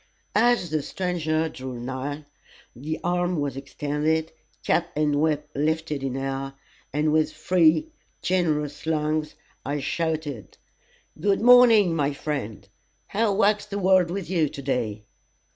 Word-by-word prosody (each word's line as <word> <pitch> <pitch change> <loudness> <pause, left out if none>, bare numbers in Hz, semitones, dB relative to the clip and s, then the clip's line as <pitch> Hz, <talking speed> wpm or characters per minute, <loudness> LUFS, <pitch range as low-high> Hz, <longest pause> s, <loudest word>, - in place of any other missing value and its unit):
As 230 -6 +3
the 155 -1 0
stranger 160 -2 -1
drew 130 -5 -7
nigh, 130 +4 -5 0.5
the 150 +6 -4
arm 175 -1 0
was 140 -3 -2
extended, 150 +3 -1 0.3
cap 170 +1 +1
and 150 -1 +1
whip 150 -1 0
lifted 155 0 -1
in 135 -1 -3
air, 135 0 -4 0.4
and 150 +2 +1
with 155 0 +2
free, 180 - +2 0.3
generous 155 -5 0
lungs, 155 -1 -1 0.3
I 145 +2 -2
shouted 155 - -3 0.6
"good 200 -1 +1
morning, 230 -7 +7
my 145 -2 0
friend, 140 -8 -5 0.4
how 215 0 +1
wags 210 0 +2
the 200 -1 -4
world 185 -2 +4
with 185 0 -4
you 165 -4 +1
to 140 - -8
day?" 115 -6 -2
155 Hz, 130 wpm, -25 LUFS, 145-180 Hz, 0.6 s, morning